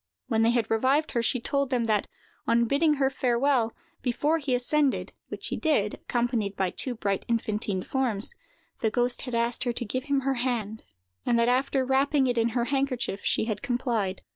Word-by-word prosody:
When 225 Hz, -3 st, +2 dB
they 225 Hz, -, +4 dB
had 235 Hz, -2 st, 0 dB
revived 265 Hz, +7 st, +2 dB
her, 235 Hz, -, +1 dB
she 250 Hz, +2 st, +1 dB
told 280 Hz, +3 st, 0 dB
them 250 Hz, -3 st, +1 dB
that, 215 Hz, -3 st, +1 dB, 0.4 s
on 235 Hz, 0 st, +3 dB
bidding 295 Hz, +5 st, +3 dB
her 270 Hz, -1 st, +1 dB
farewell, 250 Hz, -2 st, +1 dB, 0.3 s
before 295 Hz, +6 st, +1 dB
he 275 Hz, -4 st, 0 dB
ascended—which 275 Hz, +3 st, -1 dB
he -, -, -2 dB
did, 215 Hz, -11 st, +1 dB
accompanied 235 Hz, -4 st, -1 dB
by 190 Hz, -2 st, 0 dB
two 255 Hz, -2 st, -3 dB
bright 200 Hz, -3 st, -1 dB
infantine 215 Hz, -4 st, -1 dB
forms—the 240 Hz, -, -2 dB
ghost 245 Hz, +2 st, +1 dB
had 250 Hz, -3 st, -4 dB
asked 235 Hz, +1 st, +1 dB
her 240 Hz, -, 0 dB
to 240 Hz, -, -2 dB
give 255 Hz, +5 st, -3 dB
him 280 Hz, -2 st, +1 dB
her 270 Hz, +1 st, 0 dB
hand; 220 Hz, -4 st, -2 dB, 0.4 s
and 235 Hz, -, +2 dB
that, 235 Hz, +1 st, +3 dB
after 260 Hz, +1 st, +1 dB
wrapping 270 Hz, +1 st, +2 dB
it 245 Hz, -2 st, +1 dB
in 230 Hz, +1 st, +2 dB
her 235 Hz, -, +1 dB
handkerchief, 265 Hz, -7 st, -1 dB
she -, -, +1 dB
had 215 Hz, -3 st, -3 dB
complied. 240 Hz, -7 st, -1 dB
245 Hz, 185 wpm, -27 LUFS, 225-270 Hz, 0.4 s, they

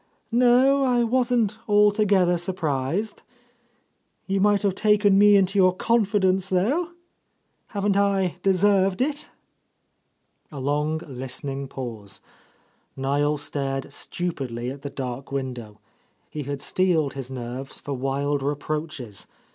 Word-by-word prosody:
No, 250 Hz, +3 st, +4 dB
I 245 Hz, -2 st, +2 dB
wasn't 235 Hz, -3 st, +1 dB
altogether 205 Hz, -3 st, +4 dB
sur 185 Hz, +2 st, -2 dB
prised. 160 Hz, +6 st, -2 dB, 1.0 s
You 195 Hz, 0 st, 0 dB
might 205 Hz, 0 st, +3 dB
have 200 Hz, -2 st, +2 dB
taken 210 Hz, 0 st, +3 dB
me 205 Hz, 0 st, +7 dB
Into 195 Hz, 0 st, +3 dB
your 185 Hz, -1 st, +4 dB
con 230 Hz, +3 st, +2 dB
fidence, 190 Hz, -2 st, +1 dB
though. 280 Hz, -, 0 dB, 0.7 s
Haven't 200 Hz, -1 st, -1 dB
I 195 Hz, -3 st, +1 dB
deserved 195 Hz, 0 st, +3 dB
it 290 Hz, +2 st, -2 dB, 0.6 s
?" -, -, -46 dB
A 145 Hz, -, -7 dB
long, 150 Hz, +3 st, -1 dB
listening 135 Hz, +1 st, -4 dB
pause. 115 Hz, -7 st, -7 dB, 0.8 s
Niel 145 Hz, +2 st, +1 dB
stared 135 Hz, -2 st, -3 dB
stu 175 Hz, 0 st, -3 dB
pidly 125 Hz, -4 st, -5 dB
at 140 Hz, -, -12 dB
the 140 Hz, -, -5 dB
dark 130 Hz, -1 st, -6 dB
window. 125 Hz, -6 st, -5 dB, 0.5 s
He 150 Hz, -, -4 dB
had 140 Hz, -1 st, -4 dB
steeled 165 Hz, -3 st, +1 dB
his 135 Hz, -2 st, -7 dB
nerves 130 Hz, +1 st, -6 dB
for 145 Hz, -, -5 dB
wild 140 Hz, +2 st, -1 dB
reproaches. 145 Hz, -5 st, -4 dB
175 Hz, 125 wpm, -24 LUFS, 135-205 Hz, 1.0 s, me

